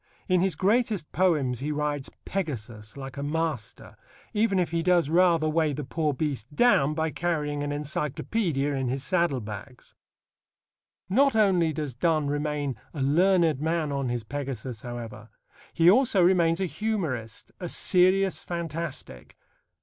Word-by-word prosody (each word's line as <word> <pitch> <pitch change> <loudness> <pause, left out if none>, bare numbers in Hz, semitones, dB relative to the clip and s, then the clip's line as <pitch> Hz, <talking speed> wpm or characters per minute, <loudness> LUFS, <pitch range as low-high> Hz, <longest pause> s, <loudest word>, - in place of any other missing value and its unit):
In 185 -2 +3
his 190 -3 +1
greatest 205 -2 +1
poems 150 -10 +1
he 150 +3 -2
rides 145 -2 -2 0.2
Pegasus 115 - -5
like 135 0 -8
a - - -3
master, 150 -6 -3 0.4
even 210 -2 +2
if 180 -2 0
he 170 0 0
does 170 -3 +2
rather 170 -2 +4
weigh 155 -1 +1
the 145 +2 -4
poor 155 +2 -1
beast 140 -2 -4
down 155 - +4
by 160 0 -1
carrying 150 -4 -2
an 145 - -2
encyclopædia 145 - -1
in 130 -1 -1
his 130 +2 -2
saddle 170 -5 +1
bags. 105 +4 -9 1.1
Not 270 +6 +3
only 185 -7 +3
does 150 -3 -4
Donne 155 +4 +1
remain 145 -3 -2 0.2
a 140 - -1
learned 165 0 +3
man 160 -1 0
on 140 -2 -1
his 120 -1 -2
Pegasus, 130 -3 -5
however: 115 -3 -8 0.4
he 165 0 +3
also 215 -1 +5
remains 175 -2 +3
a 190 - +1
humorist, 165 - -3
a 175 - -5
serious 185 -1 +3
fantastic. 165 - -6
155 Hz, 145 wpm, -27 LUFS, 135-175 Hz, 1.1 s, also